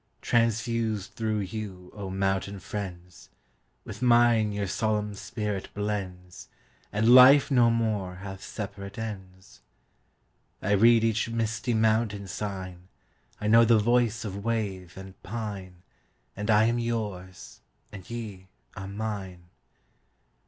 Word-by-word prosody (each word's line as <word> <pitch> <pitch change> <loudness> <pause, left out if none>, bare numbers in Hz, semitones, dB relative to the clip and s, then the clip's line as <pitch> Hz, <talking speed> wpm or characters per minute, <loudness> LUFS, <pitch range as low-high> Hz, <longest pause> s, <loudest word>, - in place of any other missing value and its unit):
Transfused 115 -3 0
through 110 -2 -1
you, 95 -3 -7
O 100 -2 -6
mountain 95 +1 -1
friends! 90 -2 -7 0.6
With 105 +1 -9
mine 120 -3 +4
your 100 0 -2
solemn 105 +1 -1
spirit 105 -1 -4
blends, 95 -4 -5 0.4
And 110 +4 +4
life 135 +3 +8
no 120 -3 +5
more 110 -5 -1
hath 95 0 -8
separate 100 -1 -7
ends.I 95 -1 -10
read 115 +3 +5
each 115 0 +1
misty 115 +1 -1
mountain 110 -2 +1
sign,I 95 0 -8
know 115 +2 +6
the 115 0 +5
voice 115 0 +2
of 100 -1 -5
wave 100 -6 -3
and 95 0 -11
pine, 95 -4 -6 0.5
And 105 +2 -5
I 105 0 +5
am 115 +2 +2
yours, 105 -6 -5 0.3
and 95 -3 -11
ye 105 -5 -7 0.3
are 95 - -6
mine. 100 -4 -6
105 Hz, 115 wpm, -27 LUFS, 95-115 Hz, 0.6 s, life